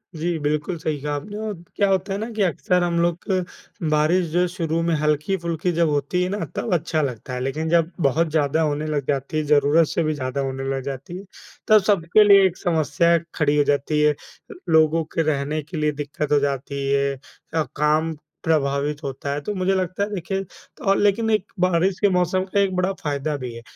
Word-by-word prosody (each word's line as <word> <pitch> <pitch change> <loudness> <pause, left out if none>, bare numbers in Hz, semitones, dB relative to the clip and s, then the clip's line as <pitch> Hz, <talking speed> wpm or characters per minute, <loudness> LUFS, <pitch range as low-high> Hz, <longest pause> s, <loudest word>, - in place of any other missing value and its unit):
जी, 165 +1 -1
बिल्कुल 150 +4 -1
सही 155 -2 -3
कहा 150 0 -2
आपने 205 +9 -6
और 210 - -2 0.2
क्या 200 - +2
होता 195 +1 0
है - - -2
ना 225 +2 -4
कि 215 -2 -3
अक्सर 180 0 +1
हम 170 -1 0
लोग 170 0 +1
क 185 -2 +1 0.5
बारिश 155 +4 +3
जो 175 - +1
है 180 - +3
शुरू 165 -2 -2
में 170 -1 +1
हल्की-फुल्की 165 +3 0
जब 165 -1 +2
होती 145 +5 0
है 180 - -1
ना, 205 - -2 0.2
तब - - -1
अच्छा 160 -1 0
लगता 125 -2 -4
है। 125 - -3
लेकिन 155 +5 -2
जब 170 0 +2
बहुत 155 +3 +2
ज़्यादा 155 0 +1
होने 150 -1 0
लग 145 -3 -2
जाती 140 +2 -1
है, 155 - +1
ज़रूरत 150 +2 +4
से 170 - -1
भी 155 0 0
ज़्यादा 130 -1 -3
होने 135 0 -3
लग 135 - -3
जाती 140 +6 -6
है, 195 - -9 0.4
तब 215 -1 +6
सबके 195 +1 +4
लिए 200 -2 +7
एक 185 -1 0
समस्या 170 0 +2 0.2
खड़ी 150 -1 +2
हो 145 - +5
जाती 145 +2 +1
है। 150 - +5
अ, 290 - -16 0.2
लोगों 160 0 +4
के 165 - +2
रहने 145 +2 -2
के 155 +3 -8
लिए 150 0 +1
दिक्कत 145 +1 -4
हो 145 - +5
जाती 140 0 -2
है 140 0 +2 0.4
अ, 160 - +2
काम 155 +2 +1 0.3
प्रभावित 145 -2 0
होता 140 0 -4
है, 145 - -3
तो 210 - -4
मुझे 185 +1 +1
लगता 185 +1 -1
है 205 - -2
देखिए 195 +1 -3 0.4
और 195 - +4
लेकिन 205 +2 +2
एक 210 -3 +2 0.2
बारिश 185 +1 +2
के 205 - +4
मौसम 180 +1 +1
का 200 +1 -1
एक 195 -2 +1
बड़ा 185 +1 +1
फ़ायदा 145 0 -2
भी 125 -3 -6
है। 115 - -9
160 Hz, 215 wpm, -22 LUFS, 145-180 Hz, 0.5 s, लिए